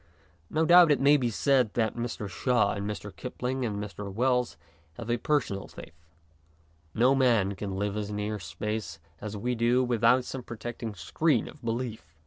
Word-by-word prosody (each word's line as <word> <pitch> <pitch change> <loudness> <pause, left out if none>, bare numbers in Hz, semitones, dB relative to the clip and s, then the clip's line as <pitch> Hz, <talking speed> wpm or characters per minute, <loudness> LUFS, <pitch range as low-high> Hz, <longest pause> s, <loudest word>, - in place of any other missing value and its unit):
No 160 +1 +1
doubt 175 0 +8
it 145 - +3
may 140 +2 +6
be 125 -4 +1
said 125 -1 +2
that 110 -3 0
Mr. 115 -3 -4
Shaw 120 +6 +1
and 100 0 -4
Mr. 105 -2 -6
Kipling 125 +1 -4
and 110 -4 -2
Mr. 100 -1 -6
Wells 125 0 0 0.4
have 115 +6 -5
a 120 - +2
personal 120 -8 -1
faith. - - -12 1.0
No 125 +4 +4
man 115 -7 +3
can 100 -1 -5
live 100 +1 -2
as 105 -1 -3
near 105 +1 -3
space 95 -1 -4 0.2
as 105 0 -6
we 125 +5 -1
do 120 +2 +2
without 120 +1 +3
some 130 - -5
protecting 120 -2 -6
screen 125 - +1
of 150 - -12
belief. 115 - -4
115 Hz, 170 wpm, -28 LUFS, 105-125 Hz, 1.0 s, doubt